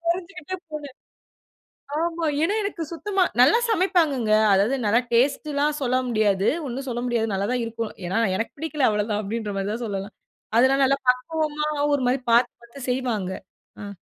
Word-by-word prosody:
கொறஞ்சுக்கிட்டேபோனேன். 335 Hz, -5 st, -4 dB, 1.1 s
ஆமா, 335 Hz, -1 st, -1 dB, 0.2 s
ஏன்னா 400 Hz, +6 st, +1 dB
எனக்கு 380 Hz, -4 st, -3 dB
சுத்தமா 385 Hz, +3 st, 0 dB, 0.2 s
நல்லா 290 Hz, -, +6 dB
சமைப்பாங்கங்க. 330 Hz, -, +2 dB, 0.2 s
அதாவது 205 Hz, +7 st, +3 dB
நல்லா 225 Hz, +4 st, +4 dB
டேஸ்ட்டலாம் 285 Hz, +4 st, +1 dB
சொல்ல 255 Hz, 0 st, +1 dB
முடியாது. 205 Hz, -3 st, +2 dB, 0.2 s
ஒன்னும் 265 Hz, +2 st, -5 dB
சொல்ல 240 Hz, 0 st, -3 dB
முடியாது 225 Hz, -3 st, 0 dB
நல்லா 195 Hz, +1 st, -1 dB
தான் 245 Hz, -2 st, 0 dB
இருக்கும். 230 Hz, -1 st, -4 dB, 0.2 s
ஏன்னா 190 Hz, +5 st, 0 dB, 0.2 s
"எனக்கு 225 Hz, -, -3 dB
பிடிக்கல 310 Hz, -4 st, 0 dB
அவ்ளோதான்!" 210 Hz, 0 st, -1 dB
அப்டின்ற 210 Hz, 0 st, -4 dB
மாரி 195 Hz, +1 st, -2 dB
தான் 235 Hz, +2 st, -4 dB
சொல்லலாம். 200 Hz, -1 st, -5 dB, 0.4 s
அதெல்லாம் 270 Hz, +3 st, +4 dB
நல்லா 275 Hz, +1 st, +2 dB
பக்குவமா 300 Hz, +3 st, 0 dB, 0.3 s
ஒரு 280 Hz, -, +1 dB
மாரி 255 Hz, +2 st, +2 dB
பாத்து 240 Hz, +1 st, +4 dB
பாத்து 235 Hz, +4 st, -13 dB
செய்வாங்க. 240 Hz, -7 st, -1 dB, 0.5 s
அ 200 Hz, 0 st, -7 dB
255 Hz, 150 wpm, -24 LUFS, 220-305 Hz, 1.1 s, நல்லா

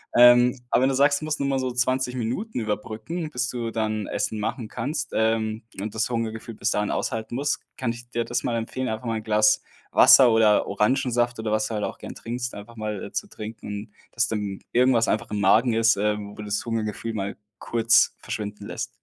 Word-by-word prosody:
Ähm, 120 Hz, +1 st, +7 dB
aber 125 Hz, -, +3 dB
wenn 135 Hz, -, +4 dB
du 135 Hz, -, 0 dB
sagst, 140 Hz, +2 st, +3 dB
du -, -, -4 dB
musst 155 Hz, 0 st, -2 dB
nur 140 Hz, -, 0 dB
mal 135 Hz, -, +1 dB
so 130 Hz, -1 st, -1 dB
20 125 Hz, +1 st, 0 dB
Minuten 125 Hz, -, -3 dB
überbrücken, 110 Hz, +10 st, -4 dB
bis 125 Hz, -3 st, -1 dB
du 120 Hz, -2 st, -3 dB
dann 110 Hz, -2 st, -1 dB
Essen 110 Hz, -, -2 dB
machen 110 Hz, +2 st, -3 dB
kannst, 135 Hz, +5 st, -3 dB
ähm, 110 Hz, 0 st, 0 dB, 0.2 s
und 105 Hz, +1 st, -5 dB
das 110 Hz, -, +1 dB
Hungergefühl 115 Hz, -1 st, -3 dB
bis 110 Hz, -, -1 dB
dahin 105 Hz, -3 st, 0 dB
aushalten 110 Hz, 0 st, -3 dB
musst, 140 Hz, +2 st, -1 dB, 0.2 s
kann 125 Hz, -3 st, -1 dB
ich 120 Hz, +1 st, -10 dB
dir 120 Hz, 0 st, 0 dB
das 120 Hz, +1 st, -2 dB
mal 120 Hz, -, -1 dB
empfehlen, 115 Hz, +3 st, -3 dB
einfach 110 Hz, +3 st, -4 dB
mal 115 Hz, -1 st, 0 dB
'n 110 Hz, -, -6 dB
Glas 105 Hz, 0 st, +3 dB, 0.3 s
Wasser 125 Hz, -3 st, +8 dB
oder 110 Hz, -2 st, +4 dB
Orangensaft 120 Hz, +2 st, +1 dB
oder 110 Hz, -1 st, -2 dB
was 110 Hz, 0 st, +1 dB
du 115 Hz, -, -5 dB
halt 105 Hz, -, -2 dB
auch -, -, -3 dB
gern -, -, -8 dB
trinkst, 120 Hz, +1 st, -5 dB
einfach 105 Hz, +3 st, -10 dB
mal, 105 Hz, -2 st, -4 dB
äh, -, -, -9 dB
zu -, -, -3 dB
trinken 110 Hz, 0 st, -9 dB
und 105 Hz, +1 st, -6 dB, 0.2 s
dass 120 Hz, +1 st, +1 dB
dann 105 Hz, -3 st, -3 dB
irgendwas 120 Hz, -2 st, +4 dB
einfach 110 Hz, 0 st, -1 dB
im 105 Hz, -, -1 dB
Magen 110 Hz, +5 st, +4 dB
ist, 115 Hz, 0 st, +4 dB
äh, 105 Hz, +1 st, +1 dB
wo 105 Hz, +1 st, -8 dB
das 105 Hz, 0 st, -2 dB
Hungergefühl 115 Hz, 0 st, -3 dB
mal 100 Hz, -1 st, -3 dB, 0.2 s
kurz 115 Hz, 0 st, +3 dB
verschwinden 105 Hz, -1 st, -6 dB
lässt. -, -, -4 dB
115 Hz, 215 wpm, -25 LUFS, 110-125 Hz, 0.3 s, Wasser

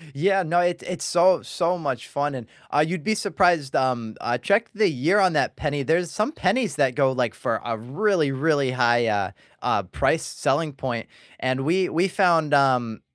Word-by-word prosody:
Yeah, 195 Hz, +6 st, +2 dB
no, 175 Hz, +1 st, +1 dB
it 175 Hz, 0 st, 0 dB
it's 180 Hz, -1 st, -5 dB
so 175 Hz, +1 st, +3 dB
so 175 Hz, +1 st, -1 dB
much 140 Hz, -8 st, -4 dB
fun, 145 Hz, 0 st, -2 dB
and, 125 Hz, -3 st, -7 dB, 0.3 s
uh, 150 Hz, +1 st, +3 dB
you'd 175 Hz, -2 st, -4 dB
be 220 Hz, -, 0 dB
surprised, 175 Hz, -9 st, +1 dB
um, 120 Hz, -4 st, -1 dB
uh, 120 Hz, 0 st, -1 dB
check 200 Hz, -, +1 dB
the 210 Hz, 0 st, +3 dB
year 160 Hz, +5 st, +1 dB
on 185 Hz, -3 st, +3 dB
that 150 Hz, -, 0 dB
penny, 145 Hz, -2 st, -2 dB
there's 165 Hz, +4 st, 0 dB
some 215 Hz, +6 st, -1 dB
pennies 255 Hz, -7 st, 0 dB
that 135 Hz, -3 st, +1 dB
go, 135 Hz, +1 st, +2 dB
like, 125 Hz, -4 st, -1 dB
for -, -, -2 dB
a 115 Hz, -, -2 dB
really, 155 Hz, -, 0 dB
really 140 Hz, 0 st, +1 dB
high, 120 Hz, -2 st, +2 dB
uh, 105 Hz, -2 st, 0 dB, 0.3 s
uh, -, -, +1 dB
price -, -, 0 dB
selling 160 Hz, -3 st, -1 dB
point, 125 Hz, -4 st, -4 dB, 0.3 s
and 130 Hz, 0 st, -1 dB
we 180 Hz, +4 st, +1 dB
we 175 Hz, +4 st, +1 dB
found, 170 Hz, -6 st, +2 dB
um, 125 Hz, -5 st, +2 dB
150 Hz, 190 wpm, -23 LUFS, 130-180 Hz, 0.3 s, so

